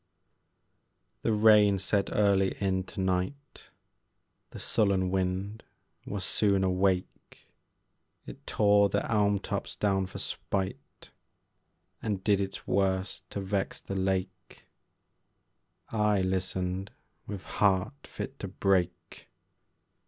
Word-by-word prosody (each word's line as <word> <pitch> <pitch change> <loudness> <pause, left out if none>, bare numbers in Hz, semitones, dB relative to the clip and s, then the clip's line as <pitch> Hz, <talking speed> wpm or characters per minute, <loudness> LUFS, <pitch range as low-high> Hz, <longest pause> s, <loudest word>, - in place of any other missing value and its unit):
The - - +1
rain 105 -2 +6
set 100 +1 0
early 100 -2 +2
in 95 -2 0
to - - -9
night, 95 +10 -3 0.8
The - - -10
sullen 95 -4 +1
wind 95 +3 -2 0.4
was 100 -2 -3
soon 100 -2 +2
awake, 95 0 -1 0.8
It - - -11
tore 100 -1 +4
the - - -1
elm 105 -2 +3
tops - - -4
down 95 -2 +1
for 90 - -9
spite, 95 -1 -4 0.9
And 100 -3 -2
did 100 -2 +3
its 95 0 -5
worst 95 0 -1
to 100 - -4
vex 95 0 -2
the - - -7
lake: 95 -1 -3 1.3
I 105 -3 +2
listened 95 0 -2 0.4
with 100 -2 -6
heart 100 +8 0
fit 135 - -7
to 100 - -4
break. 90 -3 -1
95 Hz, 110 wpm, -29 LUFS, 95-100 Hz, 1.3 s, rain